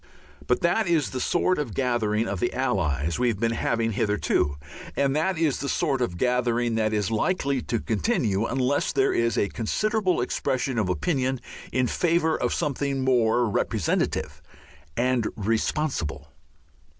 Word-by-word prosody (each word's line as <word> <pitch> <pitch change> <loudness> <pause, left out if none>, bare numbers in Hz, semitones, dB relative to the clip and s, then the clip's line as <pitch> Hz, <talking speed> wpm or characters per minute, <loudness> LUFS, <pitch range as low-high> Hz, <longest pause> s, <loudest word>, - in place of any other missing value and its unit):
But 125 - +2
that 180 +5 +2
is 160 -5 +1
the 130 - -3
sort 180 0 +1
of 125 -9 -4
gathering 115 -4 0
of 100 -2 -3
the 120 - 0
Allies 85 - 0
we 125 - +2
have 110 -5 0
been 115 0 +1
having 115 0 0
hitherto, 105 -9 0 0.4
and 140 0 +1
that 165 +4 +1
is 160 -4 +1
the 140 - -3
sort 140 -6 0
of 90 -8 -1
gathering 120 0 +1
that 110 -1 +1
is 105 -1 0
likely 140 - 0
to 115 - -2
continue 110 - 0
unless 130 +2 0
there 135 -1 +2
is 115 0 +1
a 100 - +2
considerable 200 - 0
expression 125 0 -1
of 100 -4 0
opinion 130 - 0 0.3
in 130 -1 +1
favour 165 +3 +1
of - - -1
something 140 -3 -1
more 120 -2 +3
representative 105 -2 -1 0.6
and 125 -2 +1
responsible. 105 - -1
125 Hz, 150 wpm, -25 LUFS, 110-140 Hz, 0.6 s, more